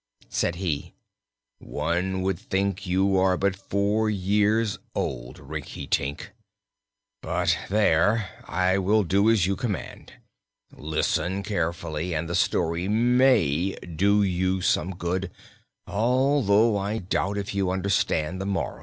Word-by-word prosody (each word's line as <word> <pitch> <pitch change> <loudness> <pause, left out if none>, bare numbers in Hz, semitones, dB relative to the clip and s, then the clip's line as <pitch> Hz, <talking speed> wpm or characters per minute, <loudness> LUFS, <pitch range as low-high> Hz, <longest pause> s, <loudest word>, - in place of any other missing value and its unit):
Said 85 - 0
he: 85 -5 -3 0.6
"One 95 +2 -2
would 95 -2 -1
think 100 -1 -2
you 95 +2 +2
are 95 -1 +3
but 100 +1 +1
four 100 +3 0
years 105 +2 +1 0.2
old, - - -4
Rinkitink! 70 +7 -4 0.9
But - - +1
there 105 +1 +3 0.2
I 95 +3 +1
will 105 +3 +3
do 100 +4 +3
as 110 -6 +3
you 100 +1 0
command. 105 -7 -5 0.6
Listen 80 +5 -1
carefully, 85 -3 -2
and 80 +2 -2
the 85 - -4
story 85 0 0
may 110 - +3
do 100 +5 +1
you 95 0 0
some 95 0 0
good 90 +1 -2 0.6
although 115 -2 +2
I 100 +3 -2
doubt 100 0 -1
if 100 0 -4
you 100 -2 0
understand 95 -2 0
the 95 - -3
moral." 100 -1 -2
95 Hz, 120 wpm, -25 LUFS, 90-105 Hz, 0.9 s, are